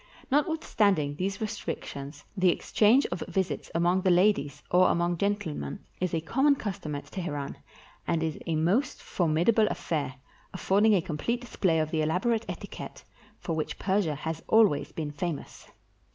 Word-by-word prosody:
Notwithstanding 215 - +2
these 195 +3 -2
restrictions, 150 -9 -5
the 185 -2 +4
exchange 220 +9 +3
of - - -3
visits 190 -2 -2
among 175 +2 +3
the 185 - +2
ladies, 175 -6 +2
or 180 +1 +5
among 175 +1 +1
gentle 205 -5 0
men, 70 - -6
is 180 -2 -1
a 160 - 0
common 270 - +3
custom 190 - -4
at 145 - -6
Teheran, 145 -7 -4 0.5
and 160 -1 +1
is 160 -2 -2
a 165 - 0
most 180 - +1
for 175 - -1
midable 210 +8 +3
affair, 140 -5 -2 0.4
affording 205 +3 +3
a 180 - +1
complete 190 +9 -2
display 190 -8 0
of 155 -1 0
the 160 - +1
elab 160 +6 0
orate 230 -1 +1
etiquette - - -7 0.3
for 165 - -3
which 155 - -3
Persia 190 -6 +1
has 160 +2 -4
always 220 -9 +4
been 155 -2 -4
famous. 150 +1 -5
180 Hz, 160 wpm, -28 LUFS, 155-210 Hz, 0.5 s, or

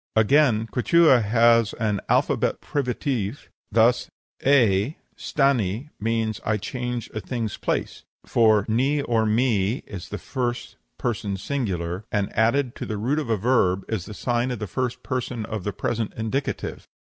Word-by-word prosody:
Again, 110 0 +4
Quichua 130 +3 +4
has 115 +1 +4
an 105 -3 -1
'alpha - - +3 0.2
privative' 125 -4 -2 0.2
thus 115 +3 +3 0.3
A 120 - +3 0.2
stani 130 -3 0
means 110 0 -1
'I 105 0 +1
change 125 +3 -4
a 110 - -3
thing's 115 -2 -4
place;' - - -2 0.2
for 110 -3 +4
ni 135 +6 +1
or 115 -3 +1
mi 110 -1 +1
is 95 -4 -8
the - - -4
first 120 -2 -4 0.2
person 105 -4 -2
singular, 95 -7 -3
and, 100 -2 -1
added 120 +3 +2
to - - -5
the 110 - -3
root 130 +9 0
of 145 -6 -4
a 110 - +2
verb, 100 -4 +2
is 105 -6 -3
the 105 - -9
sign 120 +2 0
of 125 - -3
the 105 - -4
first 125 +6 -3
person 125 -3 -3
of 110 -3 -5
the 105 - -2
present 115 +1 -2
indicative. 110 +5 -3
115 Hz, 150 wpm, -24 LUFS, 105-125 Hz, 0.3 s, Again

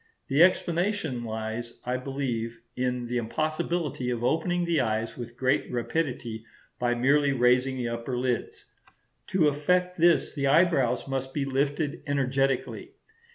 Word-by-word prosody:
The 140 +3 +3
explanation 175 - +2
lies, 110 +1 -5
I 125 +1 0
believe, 125 -4 -3 0.2
in 125 -1 -1
the 120 +1 -1
impossibility 155 +2 -2
of 120 -1 -2
opening 175 +6 +1
the 165 -4 +2
eyes 110 -1 -1
with 120 -1 -8
great 130 +1 +1
rapidity 120 -3 -2 0.4
by 120 0 +1
merely 140 +3 +3
raising 125 +1 +3
the 120 -2 -2
upper 115 +2 -3
lids. 125 -2 -2 0.6
To 170 -5 +3
effect 180 +5 +1
this 170 0 +4
the 140 -2 -1
eyebrows 140 -6 +3
must 135 -1 -3
be 140 -2 0
lifted 140 +2 -1
energetically. 135 - 0
135 Hz, 135 wpm, -27 LUFS, 120-155 Hz, 0.6 s, this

